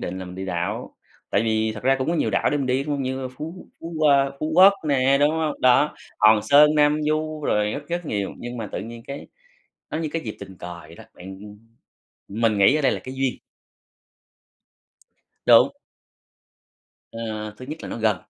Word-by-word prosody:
định 95 Hz, +2 st, -5 dB
là 95 Hz, -, -6 dB
mình 90 Hz, 0 st, -9 dB
đi 95 Hz, -, -6 dB
đảo, 90 Hz, -2 st, -4 dB, 0.4 s
tại 100 Hz, -, +2 dB
vì 110 Hz, -1 st, 0 dB
thật 110 Hz, -, -9 dB
ra 135 Hz, +1 st, +3 dB
cũng 130 Hz, -, -2 dB
có 170 Hz, -, +1 dB
nhiều -, -, 0 dB
đảo -, -, +1 dB
để 145 Hz, -, +1 dB
mình 140 Hz, -, -2 dB
đi, 130 Hz, +2 st, 0 dB
đúng 150 Hz, -, -5 dB
hông? 140 Hz, -, -2 dB
Như 130 Hz, 0 st, -3 dB
Phú 165 Hz, +6 st, -8 dB
Phú 165 Hz, +1 st, -7 dB
qua 140 Hz, -3 st, +4 dB
Phú 155 Hz, +1 st, -2 dB
Quốc 190 Hz, +3 st, +8 dB, 0.2 s
nè, 135 Hz, -1 st, +3 dB
đúng 145 Hz, -, +4 dB
hông? 160 Hz, -1 st, -2 dB
Đó, 130 Hz, +4 st, +4 dB, 0.2 s
Hòn 110 Hz, -1 st, +5 dB
Sơn, 150 Hz, +6 st, +6 dB
Nam 150 Hz, 0 st, +3 dB
Du 155 Hz, 0 st, -2 dB
rồi 105 Hz, -3 st, +1 dB
rất 145 Hz, 0 st, -7 dB
rất 175 Hz, -1 st, -3 dB
nhiều, 100 Hz, -5 st, -2 dB
nhưng 120 Hz, 0 st, -7 dB
mà 115 Hz, -, -4 dB
tự -, -, -3 dB
nhiên 115 Hz, +1 st, -8 dB
cái 140 Hz, +1 st, -7 dB, 0.6 s
nó 155 Hz, -, -3 dB
như 160 Hz, -, -2 dB
cái 165 Hz, -, -2 dB
dịp 110 Hz, -3 st, -6 dB
tình 95 Hz, -2 st, -10 dB
cờ 90 Hz, -1 st, -8 dB
vậy 80 Hz, 0 st, -14 dB
đó, -, -, -13 dB
bạn, 95 Hz, +1 st, -10 dB, 0.9 s
ưm 105 Hz, +4 st, -6 dB
mình 110 Hz, -3 st, +2 dB
nghĩ 100 Hz, +9 st, +5 dB
ở 155 Hz, -, 0 dB
đây 135 Hz, -, +3 dB
là -, -, -2 dB
cái 130 Hz, -, -9 dB
duyên. 135 Hz, -1 st, -1 dB, 2.1 s
Đúng. -, -, +7 dB, 1.4 s
Ờ, 115 Hz, -, -7 dB, 0.4 s
thứ 130 Hz, -, -10 dB
nhất 155 Hz, +2 st, -6 dB
là -, -, -7 dB
nó -, -, -5 dB
gần. 110 Hz, -3 st, +2 dB
130 Hz, 215 wpm, -23 LUFS, 110-150 Hz, 2.1 s, Quốc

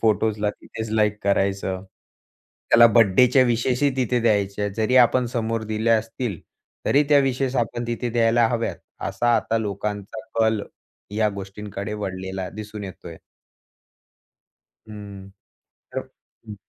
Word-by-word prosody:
फोटोजला 105 Hz, -1 st, +1 dB
तिथेच 110 Hz, +1 st, -8 dB
लाईक 105 Hz, -1 st, +1 dB
करायचं. 95 Hz, -1 st, 0 dB, 0.9 s
त्याला 115 Hz, 0 st, +8 dB
बर्थडेच्या 120 Hz, +4 st, +5 dB
विशेसही 125 Hz, +3 st, +1 dB
तिथे 125 Hz, -1 st, +1 dB
द्यायच्या. 105 Hz, -2 st, +1 dB
जरी 115 Hz, +3 st, +2 dB
आपण 125 Hz, 0 st, +5 dB
समोर 115 Hz, -1 st, -2 dB
दिल्या 110 Hz, +1 st, +2 dB
असतील, 115 Hz, -4 st, -4 dB, 0.5 s
तरी 145 Hz, +2 st, +4 dB
त्या 145 Hz, -1 st, +6 dB
विशेस 135 Hz, -1 st, 0 dB
आपण 120 Hz, 0 st, -1 dB
तिथे 120 Hz, +1 st, -2 dB
द्यायला 115 Hz, 0 st, +3 dB
हव्यात, 115 Hz, -1 st, -2 dB, 0.3 s
असा 120 Hz, +5 st, +1 dB
आता 115 Hz, -, 0 dB
लोकांचा 105 Hz, 0 st, -4 dB, 0.2 s
कल 110 Hz, -2 st, +2 dB, 0.5 s
या 110 Hz, -1 st, +3 dB
गोष्टींकडे 100 Hz, +1 st, -6 dB
वळलेला 95 Hz, -2 st, -4 dB
दिसून 105 Hz, 0 st, -7 dB
येतोय. 85 Hz, -3 st, -9 dB, 1.7 s
हं. 100 Hz, -2 st, -10 dB, 0.6 s
तर -, -, -2 dB, 0.5 s
हं. 105 Hz, -, -7 dB
110 Hz, 120 wpm, -23 LUFS, 100-120 Hz, 1.7 s, त्याला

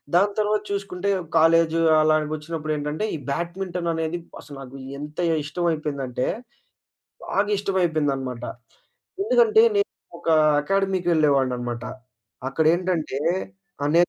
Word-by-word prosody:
దాని 200 Hz, +3 st, +4 dB
తరవాత 210 Hz, 0 st, +1 dB
చూసుకుంటే, 200 Hz, -1 st, -2 dB, 0.3 s
కాలేజు 165 Hz, 0 st, +4 dB, 0.2 s
అలానికొచ్చినప్పుడేంటంటే, 155 Hz, +1 st, -1 dB
ఈ -, -, -3 dB
బ్యాడ్మింటననేది 170 Hz, 0 st, -2 dB, 0.2 s
అసలు 145 Hz, -2 st, -11 dB
నాకు 135 Hz, 0 st, -10 dB, 0.2 s
ఎంతే 150 Hz, +4 st, -3 dB, 0.2 s
ఇష్టమైపోయిందంటే, 150 Hz, -6 st, -2 dB, 1.0 s
బాగా 205 Hz, +1 st, 0 dB
ఇష్టమైపోయిందనమాట. 150 Hz, -, -1 dB, 0.8 s
ఎందుకంటే, 450 Hz, 0 st, +5 dB
నేనొకా 285 Hz, -, -1 dB, 0.3 s
అకాడమీకి 195 Hz, 0 st, 0 dB
వెళ్ళేవాడిననమాట. 130 Hz, -6 st, +1 dB, 0.7 s
అక్కడేంటంటే 160 Hz, -1 st, +1 dB, 0.6 s
ఆహ్, 145 Hz, -, +1 dB
నేన్ 175 Hz, +1 st, +5 dB
160 Hz, 85 wpm, -24 LUFS, 150-185 Hz, 1.0 s, ఎందుకంటే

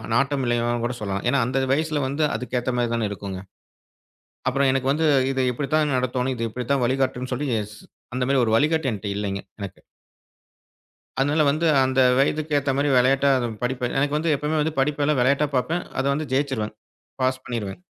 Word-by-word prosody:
நாட்டம் 140 Hz, +1 st, +1 dB
இல்லைன்னு 120 Hz, 0 st, 0 dB
கூட 120 Hz, +1 st, -2 dB
சொல்லலாம். 100 Hz, -1 st, -3 dB
ஏன்னா 140 Hz, -, +2 dB
அந்த 135 Hz, +1 st, 0 dB
வயசுல 155 Hz, 0 st, 0 dB
வந்து 145 Hz, +3 st, 0 dB
அதுக்கு 125 Hz, 0 st, -2 dB
ஏத்த 125 Hz, +1 st, -2 dB
மாரி 120 Hz, -1 st, 0 dB
தான 115 Hz, -2 st, 0 dB
இருக்குங்க. 100 Hz, -2 st, -6 dB, 1.1 s
அப்புறம் 135 Hz, +1 st, +2 dB
எனக்கு 135 Hz, 0 st, 0 dB
வந்து 160 Hz, +2 st, 0 dB, 0.3 s
இதை 130 Hz, -1 st, 0 dB
இப்படி 135 Hz, +3 st, -3 dB
தான் 150 Hz, -2 st, +2 dB
நடத்தும்னு, 125 Hz, +1 st, -1 dB
இதை 115 Hz, -, -4 dB
இப்படி 125 Hz, +3 st, -5 dB
தான் 135 Hz, -3 st, +1 dB
வழிகாட்டும்னு 130 Hz, 0 st, -1 dB
சொல்லி 140 Hz, +4 st, -2 dB, 0.7 s
அந்த 125 Hz, -, 0 dB
மாரி 135 Hz, 0 st, +3 dB
ஒரு 110 Hz, -, 0 dB
வழிகாட்டி 155 Hz, +2 st, +1 dB
என்ட்ட 105 Hz, -1 st, -5 dB
இல்லைங்க 100 Hz, -1 st, -3 dB, 0.2 s
எனக்கு. 95 Hz, -2 st, -7 dB, 1.4 s
அதனால 145 Hz, +3 st, +2 dB
வந்து 155 Hz, +4 st, 0 dB, 0.2 s
அந்த 130 Hz, 0 st, +1 dB, 0.2 s
வயதுக்கு 150 Hz, +2 st, +1 dB
ஏத்த 140 Hz, 0 st, -1 dB
மாரி 145 Hz, +1 st, +1 dB
விளையாட்டா 135 Hz, +3 st, +4 dB, 0.3 s
படிப்ப 125 Hz, 0 st, -1 dB
எனக்கு 145 Hz, +2 st, +1 dB
வந்து 160 Hz, +1 st, +1 dB
எப்பவுமே 150 Hz, +2 st, -1 dB
வந்து 155 Hz, +1 st, -1 dB
படிப்பலாம் 145 Hz, +1 st, +1 dB
விளையாட்டா 140 Hz, +4 st, +3 dB
பார்ப்பேன். 165 Hz, +7 st, 0 dB, 0.2 s
அதை 135 Hz, -, 0 dB
வந்து 155 Hz, +2 st, -3 dB
ஜெயிச்சிருவேன். 130 Hz, -6 st, -1 dB, 0.5 s
பாஸ் 130 Hz, 0 st, +1 dB
பண்ணிருவேங். 115 Hz, -, -5 dB
135 Hz, 175 wpm, -23 LUFS, 125-145 Hz, 1.4 s, விளையாட்டா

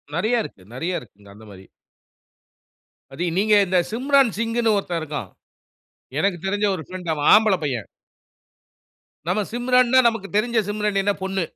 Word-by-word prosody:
நெறைய 225 Hz, +6 st, +1 dB
இருக்கு, 95 Hz, -, -11 dB
நெறைய 170 Hz, +8 st, -2 dB
இருக்குங்க 100 Hz, -3 st, -18 dB
அந்த 110 Hz, +1 st, -15 dB
மாரி. 95 Hz, -1 st, -13 dB, 1.5 s
அதயும் 170 Hz, +5 st, -3 dB
நீங்க 210 Hz, +1 st, +3 dB
இந்த 180 Hz, 0 st, +2 dB
சிம்ரான் 265 Hz, -1 st, +2 dB
சிங்ன்னு 230 Hz, -1 st, +1 dB
ஒருத்தன் 175 Hz, -4 st, -2 dB
இருக்கான். 145 Hz, -11 st, -5 dB, 0.9 s
எனக்கு 195 Hz, 0 st, +1 dB
தெரிஞ்ச 205 Hz, +2 st, 0 dB
ஒரு 160 Hz, -, -7 dB
ஃப்ரெண்ட் 180 Hz, -3 st, -5 dB
அவன் 145 Hz, -1 st, +1 dB
ஆம்பள 215 Hz, -2 st, +5 dB
பையன். 125 Hz, -7 st, -3 dB, 1.4 s
நம்ம 200 Hz, +4 st, +1 dB
சிம்ரன்னா 250 Hz, +1 st, +3 dB
நமக்கு 215 Hz, -4 st, -6 dB
தெரிஞ்ச 230 Hz, +1 st, +1 dB
சிம்ரன் 210 Hz, -1 st, 0 dB
என்ன, 205 Hz, 0 st, +1 dB
பொண்ணு. 190 Hz, -2 st, -1 dB
195 Hz, 140 wpm, -22 LUFS, 165-225 Hz, 1.5 s, ஆம்பள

